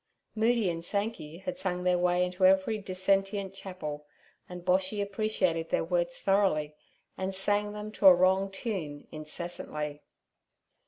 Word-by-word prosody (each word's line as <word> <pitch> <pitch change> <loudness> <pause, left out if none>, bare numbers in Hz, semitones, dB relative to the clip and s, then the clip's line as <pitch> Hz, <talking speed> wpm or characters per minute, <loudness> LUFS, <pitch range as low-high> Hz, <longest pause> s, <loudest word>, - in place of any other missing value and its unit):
Moody 225 -1 +2
and 165 -1 -2
Sankey 200 -5 -2
had 275 0 -4
sung 180 -4 -1
their 180 -1 +2
way 180 0 +2
into 180 +1 -4
every 190 +3 +4
dissentient 195 +1 0
chapel, 155 -7 -7 0.4
and 180 -1 -8
Boshy 190 +3 +1
appreciated 195 -5 0
their - - +1
words 175 0 0
thoroughly, 190 -7 +1 0.5
and 190 0 -2
sang 205 +2 +1
them 210 0 -6
to 200 -2 +4
a 185 - +10
wrong 190 +2 +3
tune 190 -8 -5
incessantly. 150 -1 -5
185 Hz, 140 wpm, -29 LUFS, 175-200 Hz, 0.5 s, a